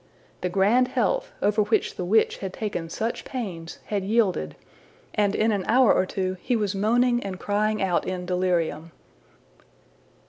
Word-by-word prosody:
The 180 Hz, -, -1 dB
grand 205 Hz, +7 st, +3 dB
health, -, -, 0 dB
over 210 Hz, +1 st, +3 dB
which 210 Hz, +1 st, +1 dB
the -, -, -4 dB
witch 215 Hz, +5 st, +2 dB
had 190 Hz, -1 st, -6 dB
taken 190 Hz, -6 st, -4 dB
such 225 Hz, +7 st, -3 dB
pains, 185 Hz, -11 st, -6 dB
had 205 Hz, -2 st, -2 dB
yielded, 195 Hz, -, +1 dB, 0.6 s
and 205 Hz, -1 st, +1 dB
in 220 Hz, +1 st, +2 dB
an 200 Hz, -3 st, -1 dB
hour 250 Hz, -1 st, +5 dB
or 185 Hz, -, +1 dB
two 185 Hz, -1 st, -2 dB
he 245 Hz, -, 0 dB
was 210 Hz, -3 st, 0 dB
moaning 240 Hz, +4 st, +2 dB
and 190 Hz, -2 st, -5 dB
crying 210 Hz, 0 st, 0 dB
out 180 Hz, -2 st, 0 dB
in 180 Hz, -1 st, -3 dB
delirium. 175 Hz, -3 st, -1 dB
200 Hz, 160 wpm, -25 LUFS, 185-220 Hz, 0.6 s, hour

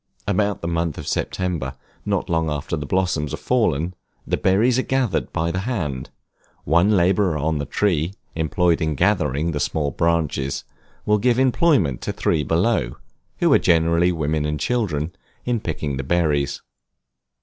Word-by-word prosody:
About 100 Hz, 0 st, 0 dB
the -, -, -1 dB
month 85 Hz, -2 st, -1 dB
of -, -, -7 dB
September, 85 Hz, -8 st, -2 dB, 0.3 s
not -, -, 0 dB
long 80 Hz, -1 st, 0 dB
after 75 Hz, +2 st, -2 dB
the 75 Hz, -2 st, -5 dB
blossoms 90 Hz, -5 st, 0 dB
are -, -, -11 dB
fallen, 90 Hz, -, 0 dB, 0.3 s
the -, -, 0 dB
berries 115 Hz, +7 st, +3 dB
are -, -, +3 dB
gathered 130 Hz, -4 st, -1 dB
by 85 Hz, +1 st, -1 dB
the 95 Hz, -, -2 dB
hand; 85 Hz, -, -3 dB, 0.5 s
one 85 Hz, +7 st, +3 dB
laborer 90 Hz, -1 st, +2 dB
on 75 Hz, +1 st, 0 dB
the 70 Hz, -, -3 dB
tree, 90 Hz, +1 st, 0 dB, 0.2 s
employed 85 Hz, +1 st, +1 dB
in 80 Hz, -1 st, 0 dB
gathering 80 Hz, -3 st, +1 dB
the 75 Hz, -, -2 dB
small 75 Hz, 0 st, -1 dB
branches, 80 Hz, -5 st, 0 dB, 0.4 s
will 105 Hz, 0 st, +3 dB
give 120 Hz, +2 st, +2 dB
employment 130 Hz, -, +2 dB
to -, -, -2 dB
three 75 Hz, -, 0 dB
below 80 Hz, -, +1 dB, 0.4 s
(who -, -, +5 dB
are -, -, +6 dB
generally 85 Hz, 0 st, +3 dB
women 80 Hz, -2 st, -1 dB
and 75 Hz, 0 st, -2 dB
children) 85 Hz, -, -1 dB, 0.3 s
in 120 Hz, -2 st, 0 dB
picking 75 Hz, -7 st, -3 dB
the 70 Hz, -, -3 dB
berries. 75 Hz, -2 st, 0 dB
85 Hz, 160 wpm, -22 LUFS, 75-95 Hz, 0.5 s, are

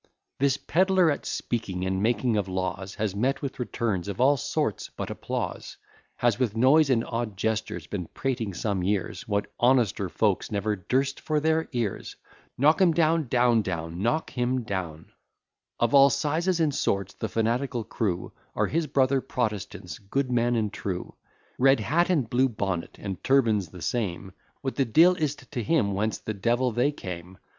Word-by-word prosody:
This 140 Hz, 0 st, +2 dB
pedler, 185 Hz, 0 st, +3 dB
at 145 Hz, -, -4 dB
speaking 95 Hz, -6 st, -3 dB
and 95 Hz, 0 st, -1 dB
making 115 Hz, +1 st, +1 dB
of 100 Hz, -2 st, 0 dB
laws, 95 Hz, 0 st, -3 dB
Has 105 Hz, -3 st, -2 dB
met 130 Hz, +8 st, 0 dB
with 135 Hz, -, -4 dB
returns 110 Hz, -6 st, -2 dB
of 100 Hz, +3 st, -5 dB
all 135 Hz, +3 st, +5 dB
sorts 145 Hz, -4 st, -2 dB
but -, -, -4 dB
applause; -, -, -4 dB, 0.4 s
Has, 120 Hz, -2 st, +1 dB
with 115 Hz, -4 st, 0 dB
noise 140 Hz, +5 st, +5 dB
and 120 Hz, -3 st, +2 dB
odd 115 Hz, -4 st, -3 dB
gestures, 110 Hz, -6 st, -2 dB
been 90 Hz, -1 st, -5 dB
prating 120 Hz, -8 st, -3 dB
some 100 Hz, 0 st, -1 dB
years, 95 Hz, 0 st, -2 dB
What 100 Hz, -1 st, -1 dB
honester 120 Hz, -6 st, +2 dB
folk 105 Hz, +1 st, 0 dB
never 105 Hz, +1 st, 0 dB
durst 135 Hz, +8 st, -1 dB
for 155 Hz, -1 st, 0 dB
their 160 Hz, +1 st, +1 dB
ears. 120 Hz, -6 st, -3 dB, 0.4 s
Knock 155 Hz, +8 st, +4 dB
him 175 Hz, -3 st, +5 dB
down, 160 Hz, -2 st, +2 dB
etc. 110 Hz, -, 0 dB, 0.7 s
Of 120 Hz, -1 st, +1 dB
all 140 Hz, 0 st, +8 dB
sizes 155 Hz, +6 st, 0 dB
and 155 Hz, -3 st, +2 dB
sorts, 100 Hz, -6 st, -1 dB
the 110 Hz, -, -4 dB
fanatical 120 Hz, +3 st, 0 dB
crew 95 Hz, -5 st, -2 dB, 0.2 s
Are -, -, +2 dB
his 165 Hz, 0 st, -1 dB
brother 135 Hz, -1 st, +2 dB
Protestants, 110 Hz, -8 st, -4 dB
good 125 Hz, +6 st, -2 dB
men 120 Hz, 0 st, +2 dB
and 110 Hz, -3 st, -1 dB
true; 90 Hz, -2 st, -4 dB, 0.5 s
Red 135 Hz, +1 st, +5 dB
hat, 165 Hz, -, +1 dB
and 150 Hz, -10 st, +2 dB
blue 130 Hz, +3 st, +2 dB
bonnet, 95 Hz, -6 st, -3 dB
and 95 Hz, -3 st, -6 dB
turban's 115 Hz, -8 st, +3 dB
the 90 Hz, -2 st, -10 dB
same, 100 Hz, -5 st, -2 dB, 0.3 s
What 135 Hz, -2 st, -4 dB
the 135 Hz, -, +4 dB
de'il 165 Hz, +10 st, +5 dB
is't 150 Hz, -4 st, -3 dB
to 125 Hz, -4 st, -2 dB
him 115 Hz, -6 st, +1 dB
whence 110 Hz, +3 st, -1 dB
the 110 Hz, -, -5 dB
devil 120 Hz, +5 st, +1 dB
they 120 Hz, +6 st, +2 dB
came. 90 Hz, -7 st, -8 dB
120 Hz, 165 wpm, -26 LUFS, 100-135 Hz, 0.7 s, all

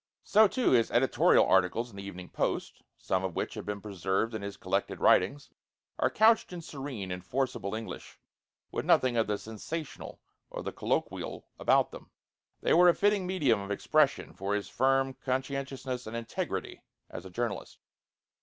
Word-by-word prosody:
So 215 Hz, +1 st, +6 dB
too 255 Hz, +5 st, +1 dB
his 115 Hz, -3 st, +4 dB
editorial 125 Hz, +2 st, +4 dB
articles 95 Hz, +6 st, +2 dB
in -, -, -14 dB
the 100 Hz, -, -7 dB
Evening 90 Hz, -2 st, -8 dB
Post, -, -, -2 dB, 0.2 s
some 95 Hz, 0 st, -1 dB
of 95 Hz, -3 st, -3 dB
which -, -, -2 dB
have -, -, -7 dB
been 105 Hz, -1 st, -3 dB
preserved 100 Hz, +2 st, -1 dB
in 110 Hz, -, -4 dB
his 100 Hz, 0 st, -6 dB
collected -, -, -2 dB
writings, 120 Hz, +11 st, +3 dB, 0.5 s
are -, -, +3 dB
couched 220 Hz, -1 st, +4 dB
in 175 Hz, -1 st, -6 dB
serene 135 Hz, -11 st, -6 dB
and 90 Hz, 0 st, -5 dB
forcible 120 Hz, -3 st, -2 dB
English, 110 Hz, 0 st, -7 dB, 0.5 s
with -, -, -2 dB
nothing 130 Hz, -2 st, +3 dB
of 115 Hz, -2 st, +2 dB
the 105 Hz, -1 st, 0 dB
sensational 135 Hz, +10 st, -7 dB, 0.3 s
or -, -, -6 dB
the -, -, -4 dB
colloquial -, -, -2 dB
about -, -, +3 dB
them. -, -, -11 dB, 0.5 s
They -, -, +3 dB
were 175 Hz, +2 st, +7 dB
a 170 Hz, -, +4 dB
fitting 205 Hz, -2 st, +2 dB
medium 145 Hz, -, +2 dB
of 100 Hz, -, -7 dB
expression 145 Hz, +7 st, +1 dB
for 100 Hz, +1 st, -2 dB
his 105 Hz, -, -3 dB
firm 135 Hz, +1 st, +2 dB
conscientiousness 130 Hz, -1 st, -3 dB
and 115 Hz, +1 st, -4 dB
integrity 115 Hz, -1 st, -4 dB, 0.3 s
as 90 Hz, -, -7 dB
a 95 Hz, -, -9 dB
journalist. 115 Hz, +2 st, -4 dB
120 Hz, 170 wpm, -30 LUFS, 100-140 Hz, 0.5 s, were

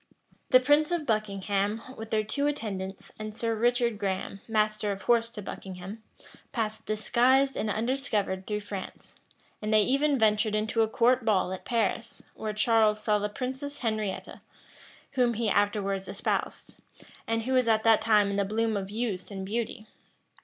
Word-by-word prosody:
The 255 Hz, -, +7 dB
prince 290 Hz, +4 st, +3 dB
and 345 Hz, -3 st, -1 dB
Buckingham, 205 Hz, -1 st, -1 dB
with 225 Hz, 0 st, -8 dB
their 215 Hz, -1 st, +1 dB
two 280 Hz, +7 st, 0 dB
attendants, 195 Hz, -9 st, -4 dB
and 215 Hz, 0 st, -6 dB
Sir 230 Hz, -1 st, 0 dB
Richard 235 Hz, -1 st, +1 dB
Graham, 195 Hz, 0 st, -3 dB
master 215 Hz, -1 st, +1 dB
of 195 Hz, 0 st, -5 dB
horse 235 Hz, -1 st, +3 dB
to 210 Hz, -, -6 dB
Buckingham, 190 Hz, +3 st, -8 dB, 0.5 s
passed 220 Hz, -2 st, -3 dB
disguised 255 Hz, +5 st, +3 dB
and 215 Hz, -, -1 dB
undiscovered 215 Hz, -5 st, -1 dB
through 210 Hz, -1 st, -2 dB
France; 200 Hz, -2 st, -8 dB, 0.5 s
and 215 Hz, 0 st, -2 dB
they 215 Hz, -1 st, +5 dB
even 275 Hz, +4 st, +2 dB
ventured 215 Hz, -1 st, +2 dB
into 220 Hz, +2 st, +1 dB
a 220 Hz, -, +3 dB
court 245 Hz, +3 st, +3 dB
ball 190 Hz, -4 st, +2 dB
at 190 Hz, -, -8 dB
Paris, 230 Hz, 0 st, -1 dB
where 215 Hz, -, -4 dB
Charles 215 Hz, 0 st, +3 dB
saw 210 Hz, -1 st, +1 dB
the 210 Hz, 0 st, -1 dB
princess 265 Hz, +6 st, -5 dB
Henrietta, 215 Hz, -3 st, -3 dB, 0.7 s
whom 245 Hz, -3 st, +2 dB
he 225 Hz, -1 st, 0 dB
afterwards 200 Hz, -2 st, 0 dB
espoused, 195 Hz, +2 st, -3 dB, 0.5 s
and 225 Hz, 0 st, 0 dB
who 260 Hz, +3 st, -1 dB
was 255 Hz, -2 st, +3 dB
at 220 Hz, -1 st, +3 dB
that 225 Hz, -1 st, +5 dB
time 210 Hz, -2 st, +4 dB
in 200 Hz, -, -2 dB
the 200 Hz, -, +2 dB
bloom 220 Hz, +2 st, 0 dB
of 195 Hz, -1 st, -3 dB
youth 210 Hz, -4 st, -3 dB
and 195 Hz, -2 st, -5 dB
beauty. 220 Hz, +1 st, -3 dB
215 Hz, 165 wpm, -28 LUFS, 205-235 Hz, 0.7 s, The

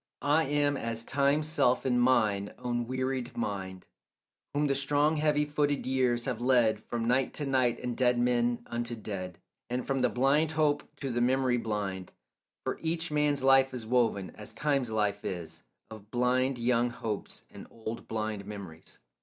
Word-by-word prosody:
I 150 Hz, +3 st, +3 dB
am 145 Hz, 0 st, +1 dB
as 115 Hz, -1 st, -3 dB
Time's 140 Hz, +4 st, +1 dB
self 130 Hz, -6 st, +2 dB
in 125 Hz, -2 st, +2 dB
mine 110 Hz, -5 st, +2 dB
own 120 Hz, -1 st, -2 dB
wearied 130 Hz, -1 st, -3 dB
mind, 95 Hz, -4 st, -4 dB, 0.7 s
Whom 145 Hz, +1 st, +1 dB
the 140 Hz, -, +2 dB
strong 145 Hz, +3 st, +2 dB
heavy 150 Hz, -1 st, +2 dB
footed 145 Hz, -1 st, 0 dB
years 125 Hz, -2 st, +1 dB
have 125 Hz, -3 st, -3 dB
led 120 Hz, -4 st, +3 dB
From 115 Hz, -1 st, -3 dB
night 125 Hz, +2 st, +1 dB
to 145 Hz, -, -1 dB
night 130 Hz, -3 st, +2 dB
and 125 Hz, -1 st, -3 dB
dead 125 Hz, -1 st, +3 dB
men 120 Hz, 0 st, +1 dB
unto 120 Hz, 0 st, -3 dB
dead, 95 Hz, -5 st, -6 dB, 0.3 s
And 125 Hz, +1 st, -2 dB
from 135 Hz, -1 st, 0 dB
the -, -, +3 dB
blind 145 Hz, +5 st, +2 dB
hope 150 Hz, -2 st, +2 dB, 0.2 s
to 135 Hz, -2 st, -2 dB
the 120 Hz, 0 st, 0 dB
memory 130 Hz, 0 st, +2 dB
blind; 100 Hz, -5 st, -3 dB, 0.5 s
For -, -, -3 dB
each 165 Hz, 0 st, -1 dB
man's 150 Hz, -2 st, +1 dB
life 135 Hz, -1 st, +5 dB
is 120 Hz, -3 st, -5 dB
woven, 110 Hz, -5 st, +1 dB
as 105 Hz, +1 st, -9 dB
Time's 140 Hz, -3 st, 0 dB
life 105 Hz, -2 st, 0 dB
is, 85 Hz, -3 st, -6 dB, 0.3 s
Of 105 Hz, -1 st, -11 dB
blind 125 Hz, +2 st, +1 dB
young 120 Hz, 0 st, +2 dB
hopes 110 Hz, -3 st, -5 dB
and -, -, -11 dB
old 115 Hz, 0 st, -7 dB
blind 110 Hz, -2 st, -3 dB
memories. 95 Hz, -6 st, -9 dB
125 Hz, 170 wpm, -30 LUFS, 110-135 Hz, 0.7 s, life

